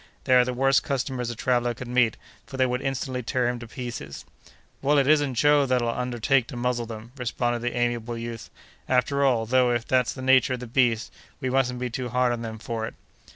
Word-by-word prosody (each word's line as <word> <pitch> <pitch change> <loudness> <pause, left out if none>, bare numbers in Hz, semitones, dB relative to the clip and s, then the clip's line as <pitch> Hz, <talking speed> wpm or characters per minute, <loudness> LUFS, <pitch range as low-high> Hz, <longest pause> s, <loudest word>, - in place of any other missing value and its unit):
They 130 - +2
are 125 0 +7
the 125 - -2
worst 135 +1 +3
customers 130 -3 -2
a 120 - -4
traveller 120 0 0
could 130 - -8
meet, 120 -2 +2 0.3
for 135 - -8
they 130 - +3
would 125 0 -1
instantly 135 -1 -2
tear 125 +1 0
him 120 0 -2
to 120 - -9
pieces." 120 - -7 0.6
"Well, 145 +2 +3
it 140 - +4
isn't 145 -3 +3
Joe 145 +2 +4
that'll 125 -2 +1
undertake 125 +1 0
to 125 - -7
muzzle 120 -1 -1
them!" 110 +1 -9
responded 120 -1 -1
that 120 0 -2
amiable 120 -1 -1
youth. 115 -1 -6 0.4
"After 130 +2 +2
all, 120 -5 +2
though, 125 +1 +3
if 120 -1 -1
that's 125 -4 +2
the 130 - -8
nature 130 0 +4
of - - -9
the 125 - -6
beast, 115 -2 +1 0.3
we 130 -3 -2
mustn't 125 -1 +1
be 125 -1 -3
too 125 +1 -4
hard 125 +1 +2
on 120 - -4
them 110 -1 -5
for 110 0 -4
it!" - - -10
125 Hz, 220 wpm, -25 LUFS, 120-130 Hz, 0.6 s, are